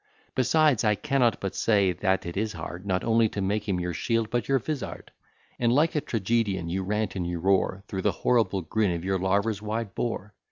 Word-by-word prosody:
Besides, 140 Hz, 0 st, +3 dB
I 105 Hz, -1 st, +3 dB
cannot 125 Hz, -1 st, +1 dB
but 95 Hz, -, -3 dB
say 100 Hz, -4 st, +3 dB
that 95 Hz, +2 st, 0 dB
it 85 Hz, -, -5 dB
is 105 Hz, +2 st, -1 dB
hard, 85 Hz, +4 st, -7 dB
Not 95 Hz, -2 st, 0 dB
only 115 Hz, -1 st, +3 dB
to 105 Hz, -, -5 dB
make 100 Hz, +2 st, -1 dB
him 90 Hz, -2 st, +1 dB
your 90 Hz, 0 st, -2 dB
shield, 115 Hz, +5 st, -1 dB
but 120 Hz, -1 st, -1 dB
your 135 Hz, -, +3 dB
vizard; 140 Hz, +3 st, -5 dB, 0.5 s
And 120 Hz, -1 st, +3 dB
like 150 Hz, +6 st, +3 dB
a 150 Hz, -, +2 dB
tragedian, 100 Hz, -6 st, -1 dB
you 95 Hz, +3 st, -1 dB
rant 105 Hz, +1 st, -1 dB
and 90 Hz, -3 st, -2 dB
you 85 Hz, 0 st, -2 dB
roar, 95 Hz, +2 st, +1 dB
Through 95 Hz, -2 st, -3 dB
the -, -, +2 dB
horrible 100 Hz, -6 st, +1 dB
grin 100 Hz, 0 st, 0 dB
of 85 Hz, +1 st, -5 dB
your 95 Hz, 0 st, 0 dB
larva's 100 Hz, +3 st, 0 dB
wide 110 Hz, -1 st, -3 dB
bore. 105 Hz, -3 st, -3 dB
105 Hz, 210 wpm, -27 LUFS, 95-115 Hz, 0.5 s, Besides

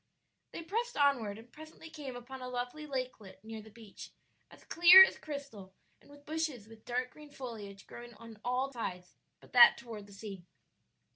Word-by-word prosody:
They 335 Hz, -, -7 dB
pressed 460 Hz, +8 st, -3 dB
onward 250 Hz, -8 st, +2 dB
and 230 Hz, +2 st, -15 dB
presently 315 Hz, +1 st, -13 dB
came 285 Hz, -5 st, -8 dB
upon 255 Hz, +2 st, -9 dB
a 250 Hz, -, -6 dB
lovely 250 Hz, +5 st, -5 dB
lakelet 255 Hz, -8 st, -6 dB
near 220 Hz, 0 st, -8 dB
the 220 Hz, -, -14 dB
beach, 220 Hz, -2 st, -12 dB, 0.4 s
as -, -, -17 dB
clear 350 Hz, +3 st, +9 dB
as -, -, -1 dB
crystal 275 Hz, -11 st, -9 dB, 0.3 s
and -, -, -22 dB
with 290 Hz, 0 st, -17 dB
bushes 305 Hz, -8 st, -3 dB
with 225 Hz, -1 st, -16 dB
dark 250 Hz, +1 st, -2 dB
green 300 Hz, -1 st, -14 dB
foliage 215 Hz, -8 st, -9 dB
growing 240 Hz, -1 st, -11 dB
on 225 Hz, -1 st, -13 dB
all 255 Hz, +2 st, -1 dB
sides 180 Hz, -6 st, -6 dB, 0.3 s
but -, -, -20 dB
that 245 Hz, -1 st, +8 dB
toward 225 Hz, -4 st, -9 dB
the 200 Hz, -, -15 dB
sea. 200 Hz, -3 st, -9 dB
245 Hz, 175 wpm, -32 LUFS, 220-285 Hz, 0.4 s, clear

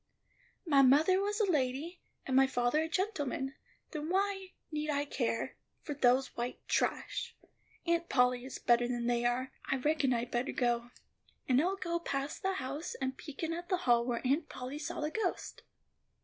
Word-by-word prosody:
"My 285 Hz, -5 st, +5 dB
mother 305 Hz, +9 st, +5 dB
was 415 Hz, +2 st, -1 dB
a 430 Hz, -, +4 dB
lady, 300 Hz, +1 st, -1 dB, 0.2 s
and 260 Hz, -, -1 dB
my 270 Hz, 0 st, +6 dB
father 245 Hz, +4 st, +1 dB
a 320 Hz, -, -2 dB
gentleman; 295 Hz, -, -1 dB, 0.4 s
then 305 Hz, 0 st, -4 dB
why 385 Hz, 0 st, 0 dB, 0.2 s
need 305 Hz, 0 st, -2 dB
I 285 Hz, -1 st, +1 dB
care 240 Hz, -5 st, -2 dB, 0.3 s
for 295 Hz, -, -3 dB
those 260 Hz, -1 st, +3 dB
white 240 Hz, +1 st, -3 dB
trash? -, -, -1 dB, 0.5 s
Aunt 340 Hz, 0 st, +1 dB
Polly 250 Hz, -1 st, +3 dB
is 265 Hz, -, -6 dB
better 240 Hz, 0 st, +3 dB
than 240 Hz, -1 st, -2 dB
they 240 Hz, 0 st, +1 dB
are. 250 Hz, +2 st, 0 dB, 0.2 s
I -, -, +3 dB
reckon 285 Hz, 0 st, +1 dB
I'd 240 Hz, 0 st, -1 dB
better 245 Hz, +3 st, -1 dB
go. 240 Hz, -1 st, 0 dB, 0.6 s
And 255 Hz, +1 st, +4 dB
I'll 370 Hz, +4 st, +1 dB
go 340 Hz, -3 st, -2 dB
past 280 Hz, -3 st, -3 dB
the 385 Hz, 0 st, +1 dB
house, 285 Hz, 0 st, -4 dB
and 265 Hz, -1 st, -2 dB
peek 295 Hz, +2 st, -8 dB
in 325 Hz, 0 st, 0 dB
at 345 Hz, +1 st, -6 dB
the 370 Hz, -, +2 dB
hall 240 Hz, -1 st, +5 dB
where 240 Hz, 0 st, -2 dB
Aunt 290 Hz, +5 st, +1 dB
Polly 255 Hz, +4 st, -6 dB
saw 300 Hz, -, -4 dB
the 300 Hz, +1 st, -1 dB
ghost." 415 Hz, -2 st, -2 dB
280 Hz, 180 wpm, -33 LUFS, 250-335 Hz, 0.6 s, my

